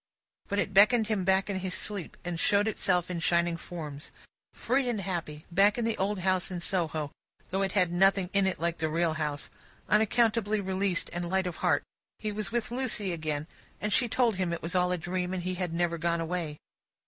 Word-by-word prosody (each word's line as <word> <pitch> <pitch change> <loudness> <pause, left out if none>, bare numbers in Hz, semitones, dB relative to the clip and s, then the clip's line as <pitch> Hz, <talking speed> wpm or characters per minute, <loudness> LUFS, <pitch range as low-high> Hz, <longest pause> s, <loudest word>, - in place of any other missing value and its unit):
But, 200 - -2
it 195 - 0
beckoned 215 +3 +6
him 210 -4 0
back 190 +1 +3
in 195 -2 -2
his 185 -1 -3
sleep, 200 -5 -3
and 175 -1 -3
showed 205 +3 +3
itself 180 -4 +1
in 175 - -2
shining 170 0 +2
forms. 155 -4 -8 0.4
Free 255 +1 0
and 230 -3 -1
happy, 170 -6 -4
back 200 +5 +4
in 235 - 0
the 225 -1 0
old 195 0 0
house 185 0 +1
in 180 -2 -4
Soho 160 -5 -1 0.4
(though 190 +1 0
it 195 -1 0
had 180 -4 +3
nothing 190 +1 +3
in 200 -1 +3
it 190 - -2
like 170 0 -1
the 160 - 0
real 165 +1 +1
house), 150 -2 -3 0.4
unaccountably 215 0 +2
released 190 -2 -1
and 175 0 -3
light 190 0 +1
of 180 -2 -4
heart, - - +2 0.3
he 215 - -3
was 210 0 -3
with 235 -1 -1
Lucie 240 -7 -1
again, 155 -2 -3 0.3
and 210 -1 -1
she 240 +2 +4
told 230 -4 +2
him 185 -2 0
it 170 - -4
was 165 +3 -3
all 180 -1 +2
a 180 - +1
dream, 180 +2 -2
and 180 - -3
he 185 +1 -2
had 180 -2 -2
never 170 0 0
gone 170 0 0
away. 165 -2 -3
185 Hz, 210 wpm, -29 LUFS, 170-205 Hz, 0.4 s, beckoned